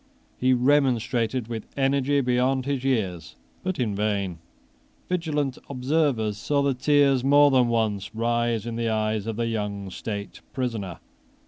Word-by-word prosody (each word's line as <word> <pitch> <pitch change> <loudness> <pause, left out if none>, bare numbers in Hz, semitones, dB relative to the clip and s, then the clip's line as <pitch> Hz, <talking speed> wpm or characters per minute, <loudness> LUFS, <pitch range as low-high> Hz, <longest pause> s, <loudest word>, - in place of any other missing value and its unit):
He 130 +1 +3
remonstrated 125 -3 +1
with 115 -2 -6
energy 140 +1 +2
beyond 130 +1 +1
his 140 -2 -2
years, 95 -11 -1 0.3
but 185 0 -2
in 115 -5 0
vain. 100 -4 -1 0.7
Vigilant 150 -7 -1
observers 130 -6 0
saw 140 +5 +1
the 140 -1 +2
tears 140 -1 +3
more 145 +1 +6
than 130 -2 +4
once 110 -3 -1
rise 115 -1 0
in 115 -1 -4
the 115 -1 0
eyes 110 -1 -1
of 115 - -2
the 115 +1 -1
young 105 -4 -3
state 100 +1 -6
prisoner. 115 -9 -3
120 Hz, 140 wpm, -25 LUFS, 110-135 Hz, 0.7 s, more